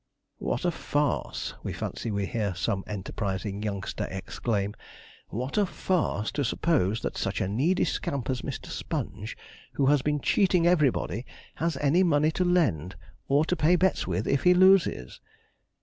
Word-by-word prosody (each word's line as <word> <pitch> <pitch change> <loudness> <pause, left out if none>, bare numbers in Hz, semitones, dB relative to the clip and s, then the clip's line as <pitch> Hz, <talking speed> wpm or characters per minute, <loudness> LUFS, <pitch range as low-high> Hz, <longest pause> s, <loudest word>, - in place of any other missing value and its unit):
'What 125 - -2
a 175 - +3
farce,' 145 -3 -1
we - - -4
fancy - - -4
we 100 -2 -1
hear 100 -3 -2
some 95 +3 -1
enterprising 100 0 -3
youngster 100 -3 -3
exclaim 100 +2 -2 0.6
'what 130 - -2
a 205 - +4
farce, 165 - -1
to 145 - -1
suppose 115 - +1
that - - -2
such - - -1
a - - 0
needy 140 - +1
scamp 140 -4 -2
as 130 -2 -1
Mr. - - -5
Sponge, - - -5 0.4
who 140 - +1
has 145 0 +4
been 150 +1 0
cheating 180 +2 +3
everybody, 140 - +2 0.3
has 165 0 -1
any 150 +5 +3
money 155 -3 +3
to 180 - 0
lend, 140 - +1 0.3
or 145 +3 +3
to 180 - 0
pay 165 +2 +4
bets 185 +1 +1
with 95 +3 -1
if 140 - +2
he 180 0 +5
loses!' 185 - +4
140 Hz, 160 wpm, -27 LUFS, 100-170 Hz, 0.6 s, he